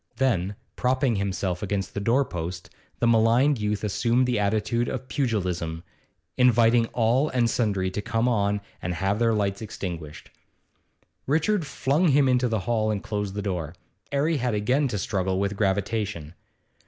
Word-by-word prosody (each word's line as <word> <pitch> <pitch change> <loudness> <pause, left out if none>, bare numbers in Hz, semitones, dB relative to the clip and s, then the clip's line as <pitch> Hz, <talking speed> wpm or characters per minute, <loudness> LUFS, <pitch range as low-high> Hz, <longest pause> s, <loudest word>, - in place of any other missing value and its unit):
Then, 105 -6 0 0.2
propping 130 -2 +1
himself 95 -2 -2
against 100 -1 -2
the - - -3
door 120 +7 +2
post, 85 -1 -6 0.3
the - - 0
maligned 115 +4 +4
youth 105 0 -1
assumed 115 +5 +1
the 125 -3 0
attitude 110 +3 0
of 130 - -5
pugilism, 90 - -2 0.5
inviting 120 -2 +4
all 125 +6 +1
and 120 -2 +2
sundry 100 -5 0
to 105 - -3
come 115 +2 0
on 105 -3 +1 0.2
and 90 0 -3
have 95 +4 0
their 115 -1 +3
lights 100 -1 -1
extinguished. 85 -7 -7 1.0
Richard 160 +4 +1
flung 145 +6 +1
him 140 -2 +4
into 125 -1 +3
the 110 -3 -1
hall 110 +1 0
and 105 -2 -2
closed 105 -2 -3
the 105 - -3
door. 90 -4 -3 0.4
'Arry 150 +3 +1
had 125 -3 -1
again 125 +8 +1
to 105 - -3
struggle 95 -2 -1
with 100 +1 -1
gravitation. 100 -4 -1
110 Hz, 155 wpm, -25 LUFS, 100-125 Hz, 1.0 s, maligned